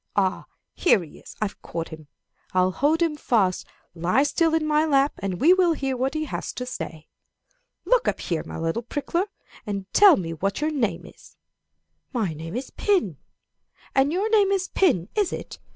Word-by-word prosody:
Ah, 190 -2 0 0.3
here 215 - +3
he 155 - -13
is - - -13
I've 205 - -5
caught 165 -1 -5
him! 155 -2 -11 0.5
I'll 185 0 +3
hold 300 - +2
him 325 -3 0
fast. 210 -10 +1 0.3
Lie 180 +10 +2
still 325 +2 +2
in 320 -1 +1
my 305 0 +3
lap, 280 -2 +3
and 190 -3 -3
we 335 +6 +6
will 365 -3 +3
hear 270 -3 -2
what 265 +4 -1
he 310 0 -1
has - - -4
to 250 - -5
say. 160 -10 -7 0.8
"'Look - - +3
up - - 0
here, 165 -3 -2
my - - -8
little 165 +7 -1
prickler, 315 - -2 0.4
and 200 -3 -4
tell 400 -4 +8
me 165 -3 -4
what 195 +5 -2
your 305 +1 0
name 225 - -1
is. - - -16 0.8
My 210 -9 -1
name 165 +4 -7
is 255 +2 -5
pin. 350 - 0 0.8
Ah, 270 - +6
your 345 +10 +1
name 415 -3 +4
is 385 -1 0
pin, 255 - +2
is 415 -4 +1
it? - - -7
260 Hz, 185 wpm, -24 LUFS, -, 0.8 s, tell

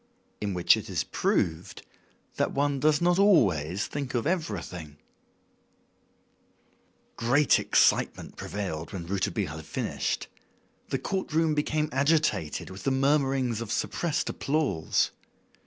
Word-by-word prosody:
In 100 -3 -2
Which 90 - +5
It - - -7
Is - - -1
Proved 80 0 -1 0.5
That - - 0
One 140 0 +1
Does 150 +2 +3
Not 175 +1 +3
Always 100 - +3
Think 140 -3 -4
of 120 - 0
Everything 90 - -3 2.2
Great 135 +5 +3
excitement - - +2
prevailed 90 -6 -5
when 90 -3 -5
Rouletabille 95 -2 -2
had 80 - -8
finished. - - -3 0.6
The - - 0
court 190 -3 -3
room 160 -1 +3
became 150 +1 0
agitated 140 - +1
with 95 - -9
the - - 0
murmurings 135 -3 +1
of 110 -3 -5
suppressed 170 +5 -1
applause. 135 - 0
130 Hz, 120 wpm, -27 LUFS, 95-150 Hz, 2.2 s, Which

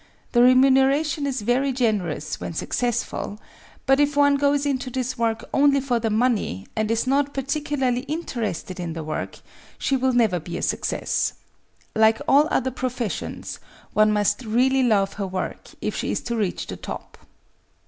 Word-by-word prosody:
The 240 - +4
re 250 +1 +7
muneration 275 +3 +3
is 260 -5 -2
very 255 +5 +2
generous 200 - -1
when - - -5
successful, 240 -1 -2 0.5
but 270 +1 +4
if 290 0 +2
one 285 0 +5
goes 285 0 +2
into 265 -2 -1
this 255 0 -2
work 230 -2 -1
only 280 0 +4
for 255 -3 0
the 225 -1 -1
money 215 - 0
and 215 -1 0
is 230 +1 +1
not 280 +2 +1
particularly 275 -2 -1
in 315 +4 -2
terested 205 - -4
in 170 -2 -4
the 165 -1 -5
work, 155 0 -4 0.4
she 275 - 0
will 260 0 +1
never 220 -7 +3
be 170 +2 -6
a - - -5
success. - - -1 0.6
Like 220 +1 +4
all 290 +2 +5
other 260 - 0
professions, 250 -3 -4 0.3
one 215 0 +4
must 210 +3 +1
really 255 +4 +2
love 205 -6 +2
her 195 - -1
work 185 0 -5
if - - -2
she - - -2
is - - -1
to 235 - -3
reach 205 -5 -1
the - - -7
top. - - -8
245 Hz, 170 wpm, -23 LUFS, 215-270 Hz, 0.6 s, re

